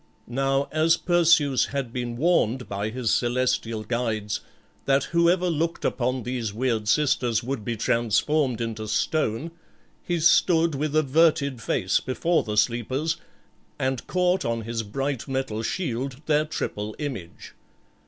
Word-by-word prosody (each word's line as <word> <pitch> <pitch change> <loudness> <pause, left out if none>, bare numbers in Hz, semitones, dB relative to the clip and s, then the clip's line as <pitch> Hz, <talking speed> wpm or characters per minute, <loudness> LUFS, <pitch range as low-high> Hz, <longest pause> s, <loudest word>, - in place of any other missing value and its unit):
Now 135 +3 0
as 160 +2 +3
Perseus 165 -6 +3
had 135 -4 -4
been 120 -1 -3
warned 130 -6 +1
by 100 +2 -3
his 120 0 -1
celestial 120 -3 0
guides 110 -2 -2 0.5
that 135 0 +3
whoever 170 +3 +2
looked 165 0 -1
upon 125 0 -1
these 120 -3 -3
weird 115 -3 -1
sisters 125 -4 +2
would 125 -2 -3
be 115 +1 -3
transformed 120 +4 +1
into 110 -2 -4
stone, 115 +6 0 0.5
he 175 -1 -2
stood 165 0 +4
with 150 +2 -2
averted 145 -3 +2
face 95 -4 +1
before 165 +6 0
the 105 -1 -4
sleepers, 130 +8 0 0.6
and 130 -1 -2
caught 180 0 +1
on 115 0 -1
his 115 +1 -3
bright 135 +4 -3
metal 130 -5 -2
shield 130 -1 -3
their 150 0 +2
triple 105 -8 -4
image. 120 - -6
130 Hz, 135 wpm, -25 LUFS, 115-155 Hz, 0.6 s, stood